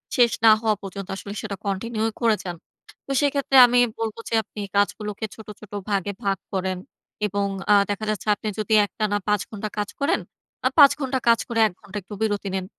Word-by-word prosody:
শেষ 240 Hz, -2 st, +5 dB
না 220 Hz, -, +9 dB
হওয়া 220 Hz, -2 st, +2 dB
পর্যন্ত 195 Hz, -1 st, -7 dB
আসলে 200 Hz, +1 st, -7 dB
সেটা 210 Hz, -3 st, -4 dB
কন্টিনিউ 215 Hz, +3 st, -2 dB, 0.2 s
করে 230 Hz, -2 st, +4 dB
যান। 175 Hz, -2 st, -5 dB, 0.5 s
তো -, -, -6 dB
সেক্ষেত্রে 280 Hz, -1 st, +1 dB
আমি 245 Hz, +1 st, +3 dB, 0.2 s
বলব 225 Hz, -1 st, -3 dB
যে, -, -, -6 dB
আপনি 215 Hz, -, -11 dB, 0.2 s
কাজগুলোকে 210 Hz, +1 st, 0 dB
ছোট, 220 Hz, -, -13 dB
ছোট 215 Hz, -, -14 dB, 0.2 s
ভাগে 200 Hz, 0 st, 0 dB
ভাগ 195 Hz, -1 st, +1 dB, 0.2 s
করেন 190 Hz, -1 st, -1 dB, 0.5 s
এবং 200 Hz, 0 st, -1 dB, 0.3 s
আ -, -, +8 dB, 0.2 s
দেখা 205 Hz, +1 st, -2 dB
যাচ্ছে 215 Hz, -1 st, -3 dB
আপনি 215 Hz, -, -7 dB
যদি 215 Hz, 0 st, -1 dB
একটানা 205 Hz, 0 st, -1 dB
৫ 210 Hz, -2 st, +2 dB
ঘন্টা 215 Hz, 0 st, -5 dB
কাজ 205 Hz, 0 st, -1 dB
করেন? 295 Hz, +6 st, +1 dB, 0.5 s
আ -, -, +7 dB
৫ 280 Hz, -2 st, +10 dB
ঘন্টা 265 Hz, -2 st, -1 dB
কাজ 230 Hz, -1 st, +6 dB
করে, 235 Hz, -2 st, -1 dB
১ 210 Hz, -, -9 dB
ঘন্টা 205 Hz, 0 st, -8 dB
একটু 195 Hz, +3 st, -11 dB
বিরতি 205 Hz, -2 st, 0 dB
নিন 190 Hz, -1 st, -2 dB
210 Hz, 195 wpm, -23 LUFS, 200-230 Hz, 0.5 s, ৫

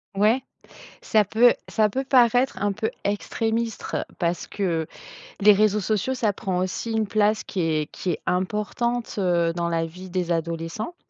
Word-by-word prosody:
Ouais, 215 Hz, +6 st, +3 dB, 0.6 s
ça 215 Hz, -1 st, +3 dB
peut 225 Hz, +5 st, +5 dB, 0.2 s
ça 215 Hz, -1 st, +2 dB
peut 265 Hz, +6 st, -2 dB
paraître 250 Hz, 0 st, +3 dB
un 205 Hz, 0 st, +1 dB
peu 215 Hz, +2 st, -2 dB
extrémiste 225 Hz, +2 st, -2 dB
parce 170 Hz, -1 st, -1 dB
que 170 Hz, -5 st, -1 dB, 0.6 s
les 210 Hz, +1 st, +8 dB
réseaux 210 Hz, 0 st, +3 dB
sociaux, 215 Hz, +6 st, 0 dB
ça 225 Hz, -5 st, +1 dB
prend 190 Hz, -2 st, -3 dB
aussi 185 Hz, +5 st, -2 dB
une 220 Hz, -1 st, 0 dB
place 215 Hz, +1 st, +2 dB
qui 190 Hz, -, -5 dB
est 155 Hz, -2 st, 0 dB
qui 180 Hz, -, -3 dB
est -, -, -4 dB
importante, 210 Hz, +6 st, -1 dB
heu, 175 Hz, -3 st, +2 dB
dans 170 Hz, 0 st, -2 dB
la 165 Hz, -1 st, 0 dB
vie 180 Hz, +3 st, -10 dB
des 175 Hz, -1 st, -2 dB
adolescents. 165 Hz, -, -3 dB
205 Hz, 160 wpm, -24 LUFS, 175-220 Hz, 0.6 s, les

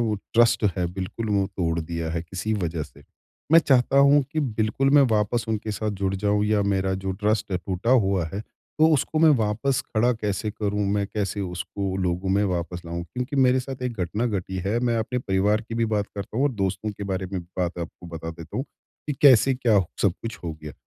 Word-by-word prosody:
वो 105 Hz, -, 0 dB, 0.2 s
ट्रस्ट 115 Hz, -1 st, +4 dB
है 90 Hz, -1 st, 0 dB
बिल्कुल 95 Hz, +4 st, -4 dB
वो 100 Hz, -1 st, +2 dB
तोड़ 85 Hz, -2 st, 0 dB
दिया 80 Hz, 0 st, -4 dB
है 85 Hz, 0 st, -2 dB
किसी 95 Hz, +5 st, -4 dB
वजह 85 Hz, -5 st, -2 dB
से। -, -, -12 dB, 0.5 s
मैं 165 Hz, -, +10 dB
चाहता 135 Hz, -2 st, +3 dB
हूँ 140 Hz, +1 st, +6 dB
कि 155 Hz, -, 0 dB
बिल्कुल 115 Hz, +1 st, 0 dB
मैं 145 Hz, 0 st, +7 dB
वापस 110 Hz, +2 st, +1 dB
उनके 110 Hz, -1 st, -2 dB
साथ 110 Hz, +1 st, -2 dB
जुड़ 95 Hz, 0 st, +1 dB
जाऊँ 105 Hz, +1 st, +1 dB
या 105 Hz, -1 st, +2 dB
मेरा 95 Hz, 0 st, 0 dB
जो 95 Hz, -, -1 dB
ट्रस्ट 105 Hz, -1 st, +1 dB
टूटा 90 Hz, +4 st, -2 dB
हुआ 100 Hz, -8 st, +3 dB
है, 100 Hz, -, -3 dB
तो 155 Hz, +8 st, -1 dB
उसको 155 Hz, +2 st, 0 dB
मैं 160 Hz, -1 st, +6 dB
वापस 115 Hz, +6 st, 0 dB
खड़ा 120 Hz, +3 st, +3 dB
कैसे 105 Hz, -1 st, -2 dB
करूँ 105 Hz, -1 st, -1 dB
मैं 100 Hz, -1 st, 0 dB
कैसे 100 Hz, -1 st, -3 dB
उसको 95 Hz, +1 st, -3 dB
लोगों 90 Hz, 0 st, -1 dB
में 100 Hz, +2 st, +3 dB
वापस 90 Hz, -2 st, -3 dB
लाऊँ? 85 Hz, +1 st, -4 dB
क्योंकि 125 Hz, -, -5 dB
मेरे 130 Hz, -1 st, +4 dB
साथ 130 Hz, 0 st, -7 dB
एक 125 Hz, -, -1 dB
घटना 105 Hz, +7 st, -1 dB
घटी 95 Hz, -4 st, -3 dB
है, 110 Hz, +4 st, +1 dB
मैं 120 Hz, -1 st, +1 dB
अपने 125 Hz, +3 st, -2 dB
परिवार 100 Hz, 0 st, +1 dB
की 115 Hz, -, -4 dB
भी 115 Hz, 0 st, +1 dB
बात 105 Hz, 0 st, 0 dB
करता 100 Hz, +1 st, -6 dB
हूँ 135 Hz, -, +2 dB
और 145 Hz, -, +1 dB
दोस्तों 100 Hz, +1 st, -2 dB
के 100 Hz, 0 st, -7 dB
बारे 95 Hz, -1 st, -2 dB
में 95 Hz, -, -2 dB
बात 90 Hz, 0 st, -4 dB
आपको 85 Hz, +1 st, -7 dB
बता 80 Hz, -1 st, -6 dB
देता 85 Hz, -1 st, -9 dB
हूँ, 130 Hz, -, -1 dB, 0.4 s
कि 150 Hz, -, -1 dB
कैसे 135 Hz, -1 st, +7 dB
क्या 120 Hz, -5 st, +3 dB, 0.2 s
सब 100 Hz, -, +4 dB
कुछ 115 Hz, -2 st, -5 dB
हो 85 Hz, -, -3 dB
गया। 75 Hz, -1 st, -7 dB
105 Hz, 215 wpm, -24 LUFS, 95-120 Hz, 0.5 s, मैं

